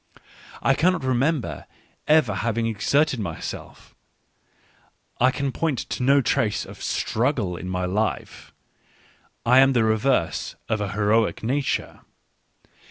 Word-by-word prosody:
I 135 - +4
cannot 165 +2 +1
remember 130 - -1 0.4
ever 150 -8 +4
having 115 +3 -1
exerted 130 +6 +1
myself, 85 -6 -7 1.3
I 125 - +5
can 135 +1 -2
point 155 -1 -1
to - - -3
no 140 +2 +4
trace 105 -4 0
of - - -12
struggle 115 - -1
in 90 +1 -6
my 90 0 -2
life; 105 +4 -3 0.9
I 125 +2 +6
am 135 0 +5
the 120 -3 +3
reverse 110 -4 0
of 110 -1 -1
a 100 -1 -3
heroic 105 +2 +1
nature. 135 +4 -1
120 Hz, 120 wpm, -24 LUFS, 105-135 Hz, 1.3 s, I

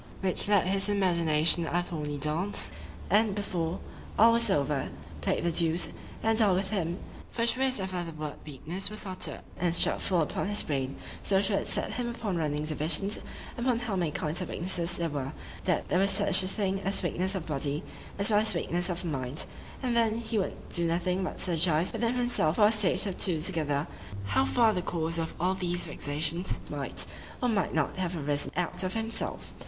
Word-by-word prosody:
—which 185 0 +2
led 205 -3 +4
his 195 +2 +2
imagination 170 -4 +4
a 175 +1 +1
thorny 150 -4 -4
dance, 155 +7 0 0.4
and, 210 -1 +4
before 180 -4 -2 0.4
all 230 +2 +7
was 235 0 +4
over, 140 -1 +1 0.3
play'd - - 0
the 170 - +1
duce 165 +1 +1 0.3
and 225 0 +3
all 200 -4 +4
with 190 +2 -1
him;——for 190 +5 -3
sure 255 +2 +3
as 265 -3 +2
ever 185 -2 -2
the 165 - -6
word 155 -2 -6
weakness 160 +7 -2
was 215 0 0
uttered, 185 -1 -1 0.2
and 175 -1 +1
struck - - +2
full 180 -3 +2
upon 155 - -1
his 205 0 -1
brain—so 140 +7 -1
sure 195 0 +1
it - - -5
set - - +3
him 245 -1 -2
upon 225 -5 -3
running 150 -2 -1
divisions 160 +7 -1 0.4
upon 245 -1 +2
how 235 -4 -2
many 175 -4 +1
kinds 155 +3 -2
of 180 - -4
weaknesses 175 -1 0
there 170 - 0
were;——that 150 +4 -3
there 180 - +3
was 195 +1 +4
such 200 +1 +5
a 185 - -2
thing 195 -1 -1
as 195 0 -1
weakness 185 +2 -1
of 180 -4 -3
the 155 - -3
body,——as 150 +8 -2
well 205 - +5
as 215 -3 +1
weakness 175 +2 -1
of 175 -1 -2
the 180 - -4
mind,—and 145 - -3
then 225 -1 +3
he 230 -1 -1
would 190 - -4
do 170 -1 -1
nothing 180 +3 0
but - - -4
syllogize 170 -1 +1
within 235 0 0
himself 240 -10 +1
for 210 - +5
a 210 - +5
stage 210 -3 +2
or 195 - -2
two 175 -3 0
together, 155 -4 -1 0.4
How 100 -2 +2
far 215 - +4
the 180 - -1
cause 165 -1 0
of 160 - -3
all 180 +2 +2
these 175 -2 -1
vexations 155 +3 +1
might, - - -3 0.3
or 250 - +1
might 200 -8 0
not, 155 +1 0
have 180 -2 -2
arisen 145 -1 -1
out 180 -1 -1
of 185 +1 -2
himself. 225 0 -3
180 Hz, 195 wpm, -29 LUFS, 160-200 Hz, 0.4 s, all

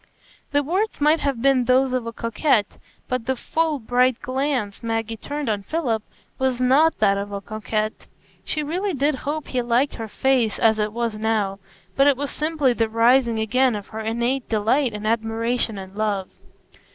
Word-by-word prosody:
The 285 0 +2
words 380 +9 -1
might 305 +2 +4
have 270 -4 -2
been 270 -2 +4
those 255 +1 +3
of 250 -2 -1
a - - -3
coquette, 230 -1 0 0.3
but 255 -2 -3
the 265 - +1
full, 320 +4 0
bright 250 0 +2
glance 260 -6 -2
Maggie 225 -1 -2
turned 290 +6 -5
on 210 -2 0
Philip 235 -2 -1 0.4
was 260 -2 0
not 275 +6 +4
that 200 -2 +3
of 200 +1 -5
a 200 - -3
coquette. 215 +1 -3 0.4
She 305 - -2
really 360 +5 -2
did 285 +3 +2
hope 290 +3 -4
he 255 - 0
liked 245 +4 +1
her 225 - -6
face 245 -1 +1
as 220 -2 +3
it 210 0 0
was 230 -1 -2
now, 210 -3 0 0.4
but 275 +1 +4
it 280 -3 +4
was 285 0 -3
simply 300 -4 +1
the 225 -1 0
rising 235 +1 +3
again 245 +3 +2
of 205 -1 -7
her 220 - -6
innate 235 +4 -1
delight 225 +4 +1
in 210 0 -6
admiration 225 0 0
and 190 0 -9
love. 205 -3 -1
240 Hz, 180 wpm, -23 LUFS, 220-275 Hz, 0.4 s, might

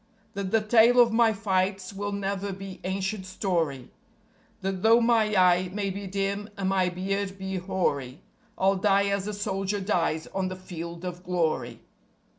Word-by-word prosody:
That 200 -2 -3
the 225 +2 +3
tale 230 +3 +5
of 235 -1 +6
my 230 -1 +5
fights 195 -2 -1
will 205 +1 -3
never 200 0 -2
be 195 0 -8
ancient 190 +2 -2
story; 165 - -2 0.7
That 190 -1 -2
though 225 +2 +6
my 230 -3 +3
eye 180 -1 +4
may 200 0 -2
be 200 +1 -6
dim 200 +2 -2
and 190 -1 -1
my 190 -2 +2
beard 195 +2 -3
be 190 0 -4
hoary, 170 -6 -2 0.3
I'll 195 +1 +3
die 200 0 +3
as 200 0 -1
a 210 - -3
soldier 195 0 -2
dies 170 -5 0
on 190 -1 -1
the 185 - -4
Field 170 -1 -7
of 180 0 -5
Glory. 160 -10 -1
195 Hz, 165 wpm, -27 LUFS, 185-200 Hz, 0.7 s, of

